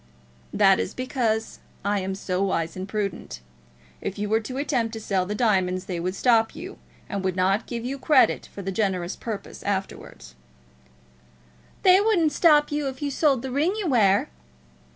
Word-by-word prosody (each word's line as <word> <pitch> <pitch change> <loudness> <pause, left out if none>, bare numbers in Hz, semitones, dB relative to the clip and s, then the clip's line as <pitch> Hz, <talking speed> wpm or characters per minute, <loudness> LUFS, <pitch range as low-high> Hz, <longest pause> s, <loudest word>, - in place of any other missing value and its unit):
"That - - +4
is 95 - -3
because 235 -4 -2 0.3
I 205 0 +1
am 190 0 -3
so 185 -1 -2
wise 170 -4 -1
and 190 +1 -6
prudent. 195 - -4 0.6
If 195 - -4
you 205 0 -3
were 220 +1 +3
to 255 +4 -7
attempt 250 -5 -1
to 225 - -5
sell 190 -4 -1
the 210 - -3
diamonds 190 -5 +1
they 180 -3 -4
would 185 +2 -2
stop 225 +2 +2
you, 350 +5 -9 0.3
and 200 -2 -4
would 185 -1 -1
not 190 +4 +1
give 235 -1 -5
you 270 +2 -4
credit 290 -1 +3
for 200 - -8
the 195 - -3
generous 190 -3 -1
purpose 220 -4 -7
afterwards." 190 - -5 1.5
"They 375 +1 +7
wouldn't 365 -8 +2
stop 295 -1 +4
you 295 -1 -1
if 265 +2 -6
you 285 - -1
sold 275 -4 +2
the 265 - -4
ring 310 +9 +1
you 420 - -3
wear." 215 - +3
220 Hz, 175 wpm, -24 LUFS, 190-270 Hz, 1.5 s, They